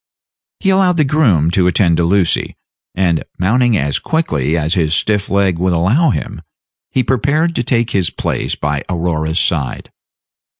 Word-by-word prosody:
He 195 - +1
allowed 190 -2 +2
the 155 - +3
groom 120 - +2
to 90 0 +2
attend 85 -2 +2
to 85 - +1
Lucy, 90 -1 0 0.4
and, 90 -3 0
mounting 115 +4 +2
as 70 -3 -1
quickly 80 - -1
as 80 +1 0
his 80 -4 +1
stiff 105 +2 0
leg 95 -3 +1
would 90 0 +1
allow 105 - +2
him, 75 - -4 0.5
he 130 - 0
prepared 145 +8 0
to 120 - -1
take 115 -1 0
his 95 -4 +1
place - - -3
by 75 -1 -2
Aurora's 80 -2 -1
side. 75 -7 -2
95 Hz, 160 wpm, -16 LUFS, 80-125 Hz, 0.5 s, the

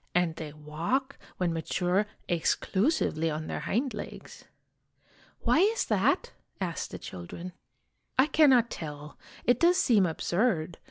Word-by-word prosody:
"And 175 -2 +2
they 155 -2 -6
walk, 165 - -2 0.2
when 175 -2 0
mature, 180 +5 0 0.2
exclusively 175 - +1
on 155 0 -3
their - - -3
hind 250 +3 -1
legs." 210 - -9 1.0
"Why - - +3
is 430 +5 +3
that?" 485 - +1 0.3
asked 175 -4 -3
the - - -7
children. 130 - -8 0.3
" - - -46
I 260 - +6
cannot 270 -7 +5
tell. 150 -2 -7 0.3
It 245 0 +3
does 350 +2 +5
seem 215 - +4
absurd. 170 0 0
180 Hz, 130 wpm, -29 LUFS, 160-255 Hz, 1.0 s, I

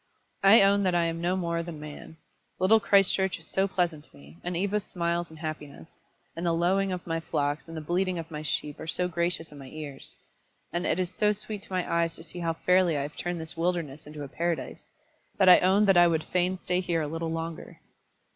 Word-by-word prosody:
I 195 +2 +8
own 200 +1 +4
that 185 -2 +1
I 170 - +3
am 165 0 -2
no 175 +2 +1
more 170 -2 -1
than 170 -2 -7
man. 150 +1 -10 0.4
Little 200 +5 +5
Christchurch 195 -2 +3
is 165 - -11
so 190 +4 0
pleasant 175 -5 -1
to - - -20
me, 70 +4 -16
and 175 -1 -2
Eva's 200 +2 0
smiles 170 -2 -2
and 160 - -13
happiness; 155 - -8 0.3
and 165 - -5
the 170 -1 +2
lowing 190 +3 +2
of 180 -1 -4
my 165 -1 -1
flocks 150 -1 -2
and 165 0 -8
the - - -4
bleating 180 +3 0
of 165 0 -6
my 150 -1 -5
sheep 150 -1 -2
are - - -7
so 180 +2 0
gracious 170 -1 -2
in 145 - -11
my 135 - -10
ears, 145 -1 -8 0.6
and 175 +1 -1
it - - +1
is 180 -1 -1
so 210 +2 +2
sweet 210 0 -5
to - - -10
my 185 -1 -1
eyes 170 -1 0
to 165 - -8
see 170 +2 -8
how 165 -1 0
fairly 180 -1 +3
I 140 - -1
have 145 +1 -7
turned 175 -1 -3
this 160 0 -6
wilderness 165 -4 -2
into 150 -1 -7
a - - -6
paradise, 165 0 -3 0.5
that 190 - +6
I 180 - +9
own 195 +3 +4
that 195 -3 +5
I 175 0 +7
would 160 -2 +1
fain 180 +1 0
stay 180 0 -1
here 170 -3 0
a - - -2
little 165 +2 -3
longer." 165 0 -5
170 Hz, 230 wpm, -28 LUFS, 160-185 Hz, 0.6 s, I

